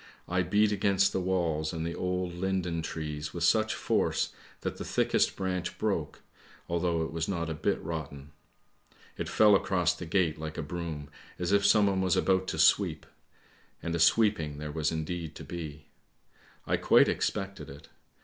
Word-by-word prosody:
I 90 +1 +1
beat 105 +4 +2
against 100 -1 +2
the - - 0
walls 85 -4 0
and 80 -2 -4
the 85 - -3
old 90 0 -2
linden 90 -2 -1
trees 75 -1 -5
with 85 - -2
such 110 +5 +3
force - - 0 0.3
that - - -3
the - - -5
thickest - - +1
branch 90 -2 -3
broke, - - -2 0.4
although 85 -1 0
it 80 - -4
was 80 0 -2
not 85 -4 -2
a - - -1
bit 75 - -1
rotten. 75 -3 -6 0.8
It - - -4
fell 105 -2 +6
across 90 -3 +2
the 90 -1 -8
gate 80 -3 +1
like 80 0 -6
a 80 - -2
broom, 75 -2 -5 0.3
as 90 +1 -2
if 100 0 +4
someone 100 -3 +4
was 95 -2 +2
about 95 -1 +2
to - - -3
sweep; - - +3 0.8
and 85 - -2
a 85 - -1
sweeping 85 -4 +3
there 75 0 -5
was 80 0 0
indeed 80 0 -4
to - - -8
be. 75 -4 -7 0.8
I - - +1
quite - - +5
expected 95 -7 -2
it. 70 +3 -12
85 Hz, 170 wpm, -29 LUFS, 80-95 Hz, 0.8 s, fell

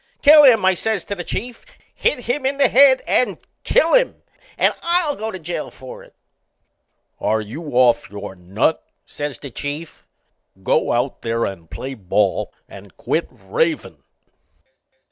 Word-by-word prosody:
"Kill 300 +1 +9
him!" 230 -8 +6
I 190 - +5
says 215 +1 -2
to - - -4
the 180 -3 -5
Chief. 240 +7 -5 0.3
"Hit 250 - 0
him 245 +4 -2
in 270 +1 0
the 275 -3 +4
head 265 0 +5
and 250 - +1 0.3
kill 330 - +2
him, - - +2 0.3
and - - +3
I'll 340 -4 +1
go 220 +1 -4
to 190 - -6
jail 170 -2 -5
for 130 -1 -11
it!" - - -19 1.0
"Are 110 +1 +1
you 110 +10 -7
off 125 -2 +3
your 105 -1 -8
nut?" 95 - -1 0.2
says 145 -1 -5
the 140 - -10
Chief. 145 +6 -7 0.6
"Go - - +1
out 125 +3 -1
there 115 0 -1
and 85 -4 -7
play 135 +1 -6
ball 100 -3 0 0.2
and - - -14
quit - - -1
ravin'." - - -2
165 Hz, 155 wpm, -20 LUFS, -, 1.0 s, Kill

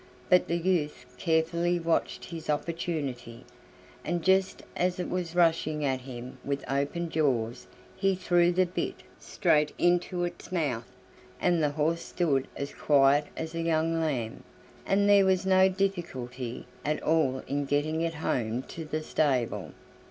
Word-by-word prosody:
But 180 - +5
the 170 - 0
youth 165 -7 0
carefully 170 +1 +1
watched 165 -1 -1
his 165 -2 -8
opportunity, 145 -6 -3 0.6
and 170 0 -2
just 190 0 +2
as 180 +1 0
it 180 - -2
was 175 -2 -3
rushing 160 -3 +2
at 130 -1 0
him 125 0 -8
with 140 0 -3
open 140 +6 -1
jaws 125 -5 0 0.3
he 195 0 +1
threw 175 -1 +3
the 185 +1 +3
bit 180 - -4 0.2
straight 150 -1 +1
into 175 0 +1
its 175 0 -5
mouth, 140 -10 -1 0.5
and 175 -2 +2
the 150 - +3
horse 160 +3 0
stood 140 -7 0
as 140 0 -5
quiet 145 0 +4
as 160 0 -4
a 165 - -2
young 165 0 +1
lamb, 125 -8 -2 0.5
and 200 +1 +3
there 200 -1 +7
was 190 0 +2
no 190 0 +5
difficulty 135 - -3 0.2
at 150 +1 0
all 150 -5 +2
in 145 +1 -1
getting 150 +3 0
it 165 0 -1
home 120 -5 -1
to 165 +5 -8
the 155 +1 -3
stable. 135 -7 0
160 Hz, 150 wpm, -28 LUFS, 140-175 Hz, 0.6 s, there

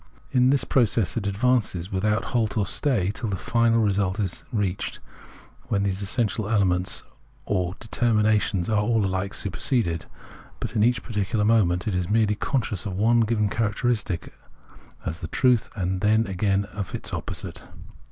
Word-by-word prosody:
In 125 -1 +4
that 135 -1 +2
process 115 -5 +2
it 105 -4 -1
advances, 100 -4 +1
without 105 +3 0
halt 115 -2 +1
or 105 - +2
stay, 110 -10 +1
till 110 - -4
the 100 - -1
final 115 +3 +2
result 100 -1 +1
is 95 -4 -2
reached, 100 -5 -2 0.7
when 100 -1 0
these 100 0 -1
essential 110 +2 0
ultimate 110 +2 0
elements 90 -2 +1 0.4
or 90 -2 -1
determinations 110 -5 +1
are 110 -1 +2
all 110 -1 +2
alike 95 +1 -2
superseded; 95 - -1 0.5
but 115 - -5
in 105 - +3
each 120 +2 +2
particular 105 -1 -1
moment 100 -5 +2
it 105 - 0
is 90 -1 -1
merely 105 -1 +3
conscious 105 -4 -2
of 95 - -4
one 115 +5 +3
given 110 -2 +2
characteristic 105 -3 -1 0.7
as 80 +1 -4
the - - -4
truth, 125 -3 +2
and 95 -2 -2
then, 110 +2 +3
again, 100 0 0
of 100 -2 -5
the - - -5
opposite. - - -5
105 Hz, 160 wpm, -25 LUFS, 95-115 Hz, 0.7 s, In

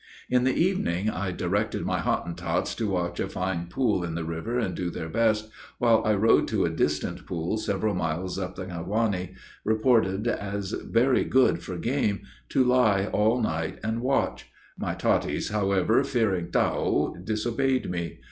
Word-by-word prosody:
In 125 0 +3
the 130 - +2
evening 110 - +1
I 95 0 -3
directed 95 +4 -1
my - - 0
Hottentots 85 - -1
to 110 -3 -2
watch 90 -2 -2
a - - -1
fine 90 -2 -2
pool 105 -1 0
in 85 -2 -3
the 85 - -2
river, 80 +9 -3
and 120 - -1
do 90 -1 -2
their 80 -1 -5
best, 110 +2 +1 0.3
while 115 -2 +4
I 110 -1 +3
rode 110 +3 +4
to - - +1
a - - 0
distant - - -1
pool 85 +4 -2
several 105 0 -1
miles 90 +2 -2
up 90 -1 -4
the 95 - -5
Ngotwani, 95 +1 -2 0.3
reported 110 -2 +2
as 100 -3 -2
very 125 +4 +2
good 130 -1 +3
for 90 - -6
game, 115 -3 0 0.3
to 130 - +3
lie 110 -6 +3
all 110 +4 +3
night 80 -6 -2
and 110 +2 -1
watch: 135 +2 0 0.3
my - - -3
Totties, - - 0
however, 100 +3 +2
fearing 105 -10 0
"Tao," - - +1
disobeyed 120 +6 0
me. 85 -1 -4
105 Hz, 165 wpm, -26 LUFS, 90-115 Hz, 0.3 s, while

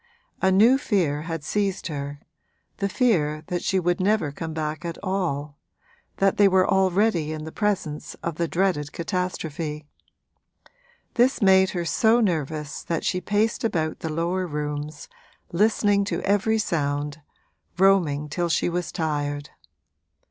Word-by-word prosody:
A 190 - +4
new 225 +8 +5
fear 175 - 0
had 165 -2 -3
seized 195 +3 -1
her, 145 -2 -5 0.6
the 200 - -1
fear 155 - +1
that 175 -1 -1
she 190 - +1
would 175 -1 0
never 190 -5 +1
come 160 +3 -6
back 155 0 -3
at 170 -1 -4
all 150 -7 -2 0.6
that 195 0 +2
they 205 - +6
were 185 -1 +4
already 190 -3 +2
in 155 -1 -5
the 160 - -7
presence 190 -8 -2
of 170 -2 -3
the 170 - 0
dreaded 170 -5 0
catastrophe. 165 -4 -3 1.3
This 250 +2 +3
made 190 -3 +5
her 170 - -1
so 220 +9 +3
nervous 155 - -1
that 165 -2 -3
she 185 -1 0
paced 210 +4 0
about 160 -8 -1
the 160 - -4
lower 175 +3 -1
rooms, 150 0 -4 0.4
listening 205 +1 +3
to - - -2
every 205 +3 +2
sound, 145 -6 -1 0.6
roaming 175 -7 +3
till 175 +3 -2
she 165 - +1
was 175 -2 -2
tired. 145 -2 -2
170 Hz, 140 wpm, -24 LUFS, 150-195 Hz, 1.3 s, they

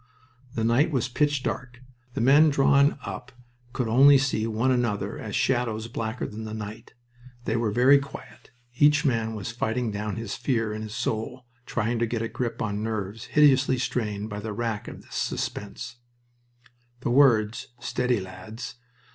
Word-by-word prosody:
The 115 - -1
night 120 +8 +3
was 135 -4 0
pitch 145 +1 0
dark. 125 -1 -4 0.4
The - - -1
men 145 +6 +6
drawn 140 0 +4
up 130 - -6 0.4
could 125 -1 -2
only 135 +5 +7
see 130 -5 0
one 115 +4 +1
another 120 -5 -1
as - - -5
shadows 115 -3 0
blacker 115 0 -3
than 110 +1 -6
the 110 0 -5
night. 110 +2 -8 0.5
They 110 - 0
were 115 -2 +1
very 125 +6 +5
quiet; 140 0 -11 0.3
each 145 0 +5
man 115 -4 0
was 105 +1 -4
fighting 115 0 -1
down 105 0 -3
his 115 -2 -4
fear 115 -5 -1
in 110 - -5
his 110 0 -6
soul, 120 +2 -3 0.2
trying 115 +1 -1
to 120 - +1
get 115 0 -2
a - - -1
grip 120 0 -3
on 105 -1 -2
nerves 110 -1 -3
hideously 140 -3 +4
strained 110 -4 -2
by 105 - -4
the 105 0 -5
rack 115 -1 -3
of - - -9
this - - -16
suspense. - - -4 1.0
The 120 - -1
words, 115 -5 +4
"Steady, 125 -1 0
lads." 95 +6 -8
115 Hz, 165 wpm, -26 LUFS, 110-130 Hz, 1.0 s, only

